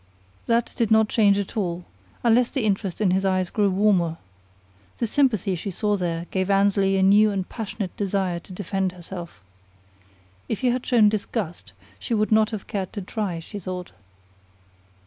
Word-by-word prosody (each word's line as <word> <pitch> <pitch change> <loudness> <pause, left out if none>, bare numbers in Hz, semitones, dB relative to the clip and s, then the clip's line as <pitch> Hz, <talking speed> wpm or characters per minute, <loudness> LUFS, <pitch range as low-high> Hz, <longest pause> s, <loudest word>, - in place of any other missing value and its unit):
That 235 0 +1
did 230 -3 0
not 220 -1 +4
change 205 -3 +4
at 200 +2 -4
all, 175 -4 -2 0.4
unless 240 +1 +4
the 265 - -2
interest 195 -2 -1
in 195 -4 +3
his 190 +1 +1
eyes 185 -2 0
grew 205 -2 +2
warmer. 185 -4 +2 0.8
The - - 0
sympathy 220 - +1
she 180 +3 -4
saw 210 +3 0
there 170 -3 -2
gave 185 0 -1
Annesley 195 -1 +3
a 190 - +2
new 205 +3 +6
and 195 -3 -2
passionate 215 -4 -5
desire 190 -3 -1
to 180 - -16
defend 190 0 -2
herself. 175 - -9 1.1
If 220 - -2
he 255 - +3
had 250 +1 -2
shown 230 -4 +5
disgust, 200 - -3 0.3
she 235 - -2
would 215 0 0
not 215 0 +4
have 215 -4 -6
cared 190 -3 -4
to 205 - -5
try, 195 -3 -3
she 205 +5 -8
thought. 180 -1 -6
200 Hz, 170 wpm, -24 LUFS, 185-215 Hz, 1.1 s, new